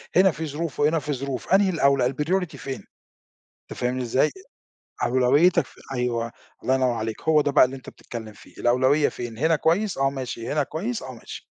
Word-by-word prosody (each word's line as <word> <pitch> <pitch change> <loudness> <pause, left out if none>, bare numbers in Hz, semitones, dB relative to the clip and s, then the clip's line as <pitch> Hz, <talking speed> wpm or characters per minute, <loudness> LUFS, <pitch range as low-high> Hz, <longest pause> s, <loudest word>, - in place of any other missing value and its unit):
هنا 190 0 +6
في 160 +1 -5
ظروف 155 +1 -4
وهنا 155 +2 +3
في 150 0 -3
ظروف، 135 +5 -3
أنهي 195 0 +5
الأولى 140 -7 +3
الpriority 165 +2 -1
فين؟ 135 -1 -6 0.9
أنت - - -7
فاهمني 125 +1 -1
إزاي؟ 125 +2 +2 0.7
أولويّتك 130 +8 +4
ف - - -19 0.2
أيوه 120 -2 -1 0.3
الله 130 - +2
ينوّر 130 -1 +2
عليك، 110 -1 -4
هو 160 -2 +4
ده 145 -1 0
بقى 130 - +7
اللي 130 - -5
أنت 130 - -10
بتتكلم 110 -3 -9
فيه 105 - -17
الأولوية 130 +5 +3
فين؟ 120 -2 -7
هنا 160 +4 +3
كويس 180 +7 +1
آه، 135 0 +2
ماشي 130 -4 -5
هنا 150 -2 +2
كويس 215 - -4
آه، 130 - -7
ماشي. 115 - -10
135 Hz, 185 wpm, -24 LUFS, 125-160 Hz, 0.9 s, بقى